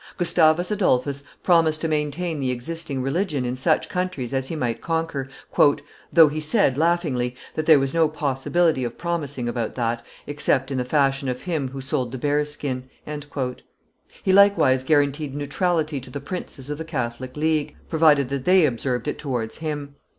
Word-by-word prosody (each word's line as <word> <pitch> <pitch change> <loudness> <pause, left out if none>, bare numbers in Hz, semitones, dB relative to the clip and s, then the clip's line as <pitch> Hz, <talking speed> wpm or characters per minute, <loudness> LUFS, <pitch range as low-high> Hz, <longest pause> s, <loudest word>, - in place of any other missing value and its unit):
Gustavus 175 0 +3
Adolphus 140 -9 +1 0.2
promised 165 -3 +3
to 165 - 0
maintain 155 +2 -1
the 130 -2 -1
existing 135 +2 -3
religion 145 -1 -1
in 125 +1 -2
such 130 - +2
countries 180 -9 -3
as 130 0 -1
he 165 - -4
might 120 -6 -2
conquer, 160 -5 -2 0.8
"though 165 -2 +8
he 150 +1 -3
said, 155 - +2
laughingly, 150 -6 0 0.2
that 155 0 -3
there 160 -2 +8
was 135 -1 0
no 165 -2 +3
possibility 150 +1 0
of 120 -1 -4
promising 145 -8 -3
about 120 -2 -3
that, 115 -1 -1 0.2
except 140 -2 0
in 130 - -1
the 125 - -1
fashion 135 0 +1
of 125 0 -4
him 160 -7 -1
who 135 +1 -7
sold 130 -2 -2
the 130 - -5
bear's 145 +2 0
skin;" 130 -3 -4 1.3
he 190 - +2
likewise 195 -10 +5
guaranteed 145 0 +1
neutrality 155 +1 -1
to 125 - -10
the 140 - -5
princes 140 -3 -6
of 150 - -4
the - - -3
Catholic 130 -4 -4
league, 155 -1 0
provided 150 -5 +4
that 135 -1 -3
they 185 -2 +6
observed 125 -1 -2
it 150 - -3
towards 125 -6 -3
him. 145 -3 -5
145 Hz, 170 wpm, -23 LUFS, 130-160 Hz, 1.3 s, though